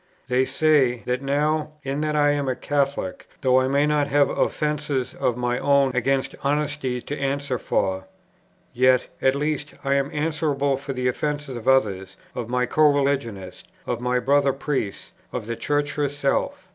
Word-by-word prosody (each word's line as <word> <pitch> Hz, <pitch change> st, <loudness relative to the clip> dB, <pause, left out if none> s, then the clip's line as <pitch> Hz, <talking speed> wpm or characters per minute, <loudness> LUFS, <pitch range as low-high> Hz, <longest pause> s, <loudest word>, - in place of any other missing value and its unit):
They 130 Hz, +1 st, +3 dB
say, 135 Hz, -7 st, +2 dB
that 125 Hz, +1 st, -1 dB
now, 150 Hz, +2 st, 0 dB
in 135 Hz, +2 st, -2 dB
that 155 Hz, 0 st, -1 dB
I 145 Hz, -1 st, +4 dB
am 145 Hz, -2 st, -1 dB
a 130 Hz, -, 0 dB
Catholic, 140 Hz, -10 st, -2 dB
though 130 Hz, -2 st, +4 dB
I 130 Hz, -, +1 dB
may 140 Hz, +2 st, +2 dB
not 150 Hz, -1 st, +1 dB
have 140 Hz, -1 st, +3 dB
offences 150 Hz, -4 st, -1 dB
of 120 Hz, -, -1 dB
my 125 Hz, 0 st, -1 dB
own 140 Hz, -2 st, +3 dB
against 130 Hz, +2 st, 0 dB
honesty 140 Hz, -3 st, -1 dB
to 145 Hz, -, -5 dB
answer 140 Hz, -2 st, -1 dB
for, 95 Hz, 0 st, -1 dB, 0.7 s
yet, 130 Hz, 0 st, +4 dB, 0.2 s
at 130 Hz, 0 st, +3 dB
least, 150 Hz, +1 st, -2 dB
I 135 Hz, 0 st, +1 dB
am 140 Hz, 0 st, +1 dB
answerable 150 Hz, -2 st, 0 dB
for 135 Hz, 0 st, -5 dB
the 125 Hz, -1 st, -1 dB
offences 145 Hz, +1 st, -2 dB
of 120 Hz, +1 st, -7 dB
others, 95 Hz, -8 st, +2 dB, 0.2 s
of 120 Hz, -2 st, -5 dB
my 125 Hz, 0 st, +1 dB
co 155 Hz, +2 st, +4 dB
religionists, 135 Hz, -9 st, -2 dB, 0.2 s
of 120 Hz, -1 st, -3 dB
my 125 Hz, 0 st, +1 dB
brother 140 Hz, +2 st, +3 dB
priests, 135 Hz, -7 st, -3 dB, 0.2 s
of -, -, -4 dB
the 115 Hz, +1 st, -3 dB
Church 145 Hz, +3 st, -1 dB
herself. 145 Hz, -1 st, -1 dB
140 Hz, 170 wpm, -23 LUFS, 125-145 Hz, 0.7 s, I